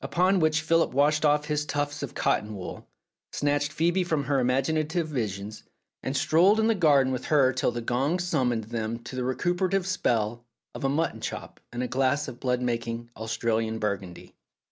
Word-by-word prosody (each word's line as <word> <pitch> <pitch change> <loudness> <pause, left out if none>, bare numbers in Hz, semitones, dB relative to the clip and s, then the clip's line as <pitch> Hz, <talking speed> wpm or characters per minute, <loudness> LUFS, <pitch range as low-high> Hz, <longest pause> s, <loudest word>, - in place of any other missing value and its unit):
Upon 185 +2 +2
which 155 -2 +2
Philip 165 +1 +2
washed 150 +2 +3
off 150 0 +3
his 150 -1 -1
tufts 145 -1 -2
of 140 - -6
cotton 105 0 0
wool, 95 -2 -8 0.4
snatched 145 0 0
Phcebe 175 +4 +1
from 160 -5 0
her 140 0 +1
imaginative 155 +6 0
visions, 105 -7 -4 0.4
and 135 +1 -2
strolled 165 +9 +4
in 220 - +3
the 225 - +4
garden 145 -9 +3
with 130 - -4
her 135 -4 +4
till 130 - +1
the 120 0 -4
gong 135 +8 0
summoned 130 -10 0
them 115 +1 -3
to 125 - -8
the 130 - -2
recuperative 180 +8 0
spell 120 - 0 0.3
of - - -7
a 135 - +2
mutton 160 +4 -1
chop - - -6
and 120 +1 -3
a - - -1
glass 135 +3 +1
of 125 -2 -8
blood 125 -1 0
making 115 -1 -3
Australian 110 0 -1
Burgundy. 100 -4 -4
135 Hz, 180 wpm, -27 LUFS, 120-155 Hz, 0.4 s, strolled